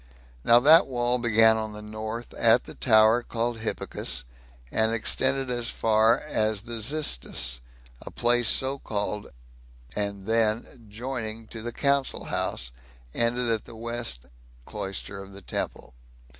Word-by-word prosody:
Now 120 Hz, -, +6 dB
that 155 Hz, +6 st, +6 dB
wall 125 Hz, -1 st, 0 dB
began 110 Hz, -1 st, +5 dB
on 110 Hz, -1 st, -4 dB
the 105 Hz, -, -8 dB
north, 110 Hz, +2 st, -6 dB
at 115 Hz, +1 st, +4 dB
the -, -, -9 dB
tower 110 Hz, 0 st, +4 dB
called 120 Hz, 0 st, -3 dB
"Hippicus," 65 Hz, -, -2 dB, 0.5 s
and 110 Hz, 0 st, +2 dB
extended 130 Hz, +3 st, +2 dB
as 120 Hz, -1 st, -1 dB
far 110 Hz, +1 st, +3 dB
as 110 Hz, -8 st, 0 dB
the 115 Hz, 0 st, -3 dB
"Xistus," 65 Hz, -, -1 dB, 0.4 s
a -, -, -8 dB
place 120 Hz, -1 st, +2 dB
so 135 Hz, +1 st, +2 dB
called, 105 Hz, -2 st, -3 dB, 0.7 s
and 100 Hz, -2 st, -3 dB
then, 115 Hz, +1 st, -1 dB
joining 115 Hz, -1 st, -5 dB
to 110 Hz, -, -7 dB
the 120 Hz, +2 st, -5 dB
council 140 Hz, +2 st, 0 dB
house, -, -, -2 dB, 0.4 s
ended 120 Hz, 0 st, +2 dB
at 110 Hz, -2 st, -1 dB
the 115 Hz, -, -10 dB
west 115 Hz, -, -3 dB, 0.4 s
cloister 100 Hz, 0 st, -5 dB
of 100 Hz, 0 st, -12 dB
the 100 Hz, -, -10 dB
temple. 60 Hz, -, -4 dB
115 Hz, 140 wpm, -26 LUFS, 110-120 Hz, 0.7 s, Now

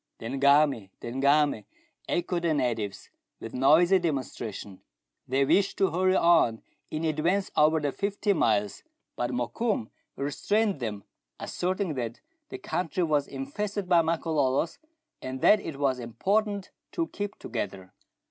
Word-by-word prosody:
'' -, -, -57 dB
The -, -, -10 dB
Ngami! 140 Hz, -3 st, +3 dB
the 120 Hz, -, -6 dB
Ngami 140 Hz, -3 st, +2 dB, 0.2 s
!" -, -, -26 dB
echoed 175 Hz, 0 st, -1 dB
the 165 Hz, -2 st, +1 dB
natives, 115 Hz, -7 st, -2 dB, 0.3 s
with 115 Hz, -, -8 dB
noisy 165 Hz, +8 st, +5 dB
demonstration. 120 Hz, -, -4 dB, 0.5 s
They 135 Hz, +2 st, +2 dB
wished 195 Hz, +7 st, +2 dB
to 195 Hz, -, +2 dB
hurry 185 Hz, +2 st, +2 dB
on 165 Hz, -12 st, +4 dB, 0.3 s
in 155 Hz, +1 st, -3 dB
advance 170 Hz, +6 st, 0 dB
over 155 Hz, +1 st, +4 dB
the 145 Hz, -2 st, -1 dB
fifteen 200 Hz, +1 st, -1 dB
miles, 105 Hz, -2 st, +1 dB, 0.3 s
but 120 Hz, -, -1 dB
Mokoum 125 Hz, -, -2 dB, 0.2 s
restrained 200 Hz, +7 st, 0 dB
them, 105 Hz, -5 st, -4 dB, 0.4 s
asserting 185 Hz, -1 st, -2 dB
that 120 Hz, -3 st, -4 dB, 0.3 s
the 390 Hz, -, -6 dB
country 180 Hz, -, -2 dB
was 150 Hz, -3 st, +1 dB
infested 190 Hz, +9 st, -4 dB
by 175 Hz, -2 st, +5 dB
Makololos, 160 Hz, -, 0 dB, 0.4 s
and 130 Hz, 0 st, -5 dB
that 210 Hz, -, +6 dB
it 160 Hz, -7 st, -7 dB
was 135 Hz, -3 st, +1 dB
important 200 Hz, -, -1 dB, 0.2 s
to 335 Hz, -, 0 dB
keep 205 Hz, 0 st, -5 dB
together. 95 Hz, -5 st, -5 dB
150 Hz, 140 wpm, -27 LUFS, 125-185 Hz, 0.5 s, that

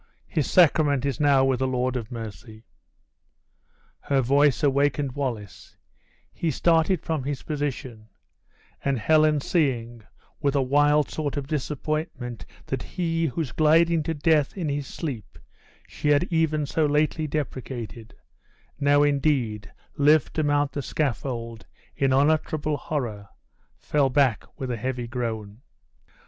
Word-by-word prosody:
his 150 Hz, -, -2 dB
sacrament 150 Hz, -6 st, +4 dB
is 140 Hz, -4 st, -2 dB
now 140 Hz, -3 st, +4 dB
with 130 Hz, -2 st, +1 dB
the 130 Hz, -, +1 dB
Lord 130 Hz, 0 st, -1 dB
of 120 Hz, -1 st, -4 dB
Mercy!" 110 Hz, -1 st, -9 dB, 1.3 s
Her 140 Hz, -1 st, 0 dB
voice 140 Hz, +3 st, +3 dB
awakened 140 Hz, 0 st, +2 dB
Wallace; 120 Hz, -7 st, -5 dB, 0.6 s
he 165 Hz, -, -2 dB
started 165 Hz, +3 st, +2 dB
from 160 Hz, -4 st, -2 dB
his 140 Hz, 0 st, -4 dB
position; 130 Hz, -7 st, -4 dB, 0.7 s
and 140 Hz, -1 st, +1 dB
Helen 155 Hz, +3 st, +3 dB
seeing, 120 Hz, -8 st, -1 dB, 0.4 s
with 140 Hz, 0 st, 0 dB
a -, -, +3 dB
wild 145 Hz, +2 st, +3 dB
sort 150 Hz, -2 st, -3 dB
of 140 Hz, -, -3 dB
disappointment 150 Hz, -4 st, -4 dB, 0.2 s
that 130 Hz, -2 st, -3 dB
he, 165 Hz, -2 st, -1 dB
whose 145 Hz, -1 st, -3 dB
gliding 160 Hz, +3 st, +3 dB
to 160 Hz, +2 st, -3 dB
death 150 Hz, +2 st, +2 dB
in 165 Hz, -5 st, -2 dB
his 140 Hz, -1 st, -3 dB
sleep 125 Hz, -, -6 dB, 0.5 s
she -, -, -5 dB
had 145 Hz, +1 st, +4 dB
even 155 Hz, -2 st, +1 dB
so 155 Hz, +2 st, +1 dB
lately 155 Hz, +2 st, +1 dB
deprecated, 130 Hz, -6 st, -5 dB, 0.6 s
now, 145 Hz, 0 st, +4 dB
indeed, 130 Hz, -8 st, 0 dB, 0.3 s
lived 150 Hz, -1 st, +4 dB
to 155 Hz, -, 0 dB
mount 145 Hz, -1 st, +1 dB
the 140 Hz, -, -3 dB
scaffold, 120 Hz, -5 st, -3 dB, 0.3 s
in 135 Hz, -1 st, +1 dB
unutterable 150 Hz, +2 st, +1 dB
horror, 110 Hz, -11 st, -4 dB, 0.5 s
fell 145 Hz, -2 st, +1 dB
back 130 Hz, -4 st, +2 dB
with 130 Hz, -2 st, -3 dB
a 120 Hz, -, -2 dB
heavy 125 Hz, +1 st, -3 dB
groan. 115 Hz, -3 st, -4 dB
140 Hz, 130 wpm, -25 LUFS, 125-150 Hz, 1.3 s, sacrament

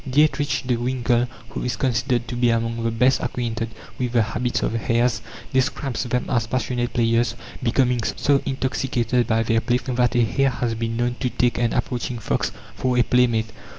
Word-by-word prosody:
Dietrich 145 Hz, -2 st, +2 dB
de 125 Hz, -2 st, +1 dB
Winckell, 120 Hz, 0 st, +1 dB, 0.2 s
who -, -, -5 dB
is 125 Hz, -3 st, -1 dB
considered 120 Hz, 0 st, 0 dB
to 120 Hz, -, -4 dB
be 120 Hz, 0 st, +3 dB
among 115 Hz, 0 st, 0 dB
the 115 Hz, -, +1 dB
best 125 Hz, +4 st, +3 dB
acquainted 115 Hz, -2 st, -2 dB, 0.3 s
with 125 Hz, -2 st, -1 dB
the 120 Hz, -2 st, +4 dB
habits 120 Hz, +2 st, -1 dB
of -, -, 0 dB
hares, 115 Hz, 0 st, +1 dB, 0.3 s
describes 130 Hz, -1 st, 0 dB
them 125 Hz, 0 st, -1 dB
as 115 Hz, -3 st, 0 dB
passionate 120 Hz, 0 st, -1 dB
players, 115 Hz, 0 st, +2 dB, 0.3 s
becoming 125 Hz, 0 st, +2 dB
so 140 Hz, +5 st, +1 dB
intoxicated 125 Hz, -2 st, 0 dB
by 115 Hz, 0 st, +2 dB
their 115 Hz, 0 st, +2 dB
play 120 Hz, 0 st, +1 dB
that 125 Hz, -1 st, 0 dB
a 120 Hz, -, +4 dB
hare 135 Hz, +4 st, +2 dB
has 120 Hz, -2 st, -2 dB
been 115 Hz, 0 st, -2 dB
known 120 Hz, 0 st, 0 dB
to 125 Hz, -, 0 dB
take 120 Hz, -1 st, +1 dB
an 120 Hz, -2 st, +1 dB
approaching 125 Hz, 0 st, -2 dB
fox 115 Hz, -, -1 dB, 0.2 s
for 125 Hz, -1 st, 0 dB
a 120 Hz, -, +5 dB
playmate. 115 Hz, -2 st, +2 dB
120 Hz, 185 wpm, -23 LUFS, 115-125 Hz, 0.3 s, a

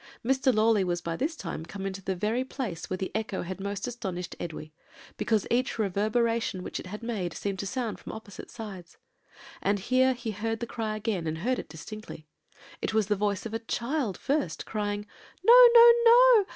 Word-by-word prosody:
"Mr. 265 Hz, +1 st, +3 dB
Lawley 215 Hz, -2 st, +3 dB
was 175 Hz, -1 st, -1 dB
by 170 Hz, -1 st, -4 dB
this 305 Hz, -, -2 dB
time 165 Hz, -, -5 dB
come 195 Hz, +4 st, -7 dB
into 195 Hz, 0 st, -4 dB
the 190 Hz, -, -2 dB
very 215 Hz, +7 st, 0 dB
place 245 Hz, -, -5 dB
where 185 Hz, -, -2 dB
the 190 Hz, -, -4 dB
echo 215 Hz, -2 st, -2 dB
had 185 Hz, +2 st, -6 dB
most 200 Hz, 0 st, -3 dB
astonished 190 Hz, -8 st, -5 dB
Edwy, 155 Hz, -2 st, -7 dB, 0.4 s
because 220 Hz, -3 st, 0 dB
each 250 Hz, +2 st, +1 dB
reverberation 220 Hz, 0 st, 0 dB
which -, -, -5 dB
it -, -, -8 dB
had 210 Hz, +4 st, -7 dB
made 200 Hz, -8 st, -3 dB
seemed 195 Hz, -2 st, -3 dB
to 200 Hz, -, -3 dB
sound 235 Hz, -1 st, -3 dB
from -, -, -8 dB
opposite 210 Hz, -3 st, -10 dB
sides; 190 Hz, -7 st, -9 dB, 0.6 s
and 200 Hz, +1 st, +1 dB
here 255 Hz, +6 st, +3 dB
he 235 Hz, -2 st, -4 dB
heard 225 Hz, +2 st, -3 dB
the 235 Hz, -, -3 dB
cry 220 Hz, -2 st, -3 dB
again, 210 Hz, -6 st, -2 dB
and 160 Hz, 0 st, -2 dB
heard 250 Hz, +9 st, -1 dB
it -, -, -8 dB
distinctly. 165 Hz, 0 st, -9 dB, 0.6 s
It -, -, -2 dB
was 215 Hz, -2 st, +2 dB
the 210 Hz, -, +3 dB
voice 205 Hz, 0 st, -1 dB
of 225 Hz, -, -5 dB
a 225 Hz, -, -1 dB
child 235 Hz, -, -2 dB
first, 285 Hz, +1 st, -1 dB
crying, 205 Hz, -1 st, -3 dB, 0.4 s
'No! -, -, +10 dB
no! 470 Hz, 0 st, +10 dB
no! 475 Hz, -2 st, +7 dB
215 Hz, 195 wpm, -28 LUFS, 190-240 Hz, 0.6 s, No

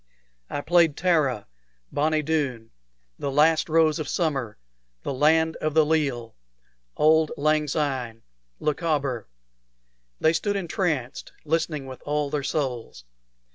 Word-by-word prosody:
I 145 Hz, -, -3 dB
played 165 Hz, -1 st, +3 dB
"Tara," 150 Hz, -, +1 dB, 0.5 s
"Bonnie 155 Hz, +1 st, +1 dB
Doon," 140 Hz, -8 st, -2 dB, 0.5 s
"The 140 Hz, -, -2 dB
Last 155 Hz, +4 st, +3 dB
Rose 160 Hz, 0 st, +3 dB
of 155 Hz, -, -3 dB
Summer," 135 Hz, -, -1 dB, 0.5 s
"The -, -, -3 dB
Land 160 Hz, +4 st, +3 dB
of 155 Hz, -1 st, -2 dB
the 160 Hz, -1 st, +5 dB
Leal," 140 Hz, -7 st, -1 dB, 0.6 s
"Auld 155 Hz, 0 st, +4 dB
Lang 155 Hz, +1 st, +2 dB
Syne," 130 Hz, -6 st, -2 dB, 0.4 s
"Lochaber." 145 Hz, -6 st, -1 dB, 0.9 s
They 160 Hz, -, +3 dB
stood 205 Hz, +5 st, -1 dB
entranced, 165 Hz, -8 st, -2 dB
listening 160 Hz, -2 st, -1 dB
with 130 Hz, -1 st, -9 dB
all 150 Hz, -1 st, -1 dB
their 150 Hz, -, -1 dB
souls. 130 Hz, -, -3 dB
150 Hz, 120 wpm, -25 LUFS, 135-160 Hz, 0.9 s, the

